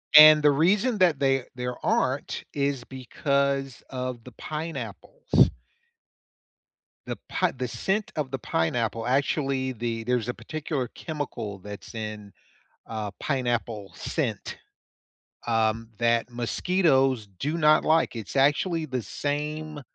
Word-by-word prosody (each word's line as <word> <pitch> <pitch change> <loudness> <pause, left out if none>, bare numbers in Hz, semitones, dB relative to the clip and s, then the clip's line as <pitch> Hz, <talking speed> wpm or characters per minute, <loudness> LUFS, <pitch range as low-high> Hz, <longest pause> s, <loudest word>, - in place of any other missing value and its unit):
And 155 0 +11
the 145 -1 +6
reason 205 - +2
that 175 -6 +4
they 135 -2 +2
there 125 0 -3
aren't - - 0
is 140 -3 0
because 135 0 -1
of 125 -2 -4
the 125 - -11
pineapples. 165 - 0 1.6
The - - -4
pi 185 -2 +1
the 125 -1 -4
scent 195 - -1
of 145 -4 -2
the 135 - -3
pineapple 115 +5 -1
actually 135 0 +1
the 115 -1 -3
there's 120 -1 0
a 125 - -1
particular 150 -5 -4
chemical 125 - -5
that's 100 +2 -9
in, 105 -2 -6 0.5
uh, 110 -2 -4
pineapple 120 - -1
scent, - - -3 0.9
um, 115 0 +1
that 115 0 +2
mosquitoes 130 - +2
do 150 +4 -1
not 155 -1 +5
like. 160 -4 +3
It's 110 +1 -6
actually 155 +5 +2
the 130 -4 -3
same, 150 +4 -3
135 Hz, 120 wpm, -26 LUFS, 115-150 Hz, 1.6 s, And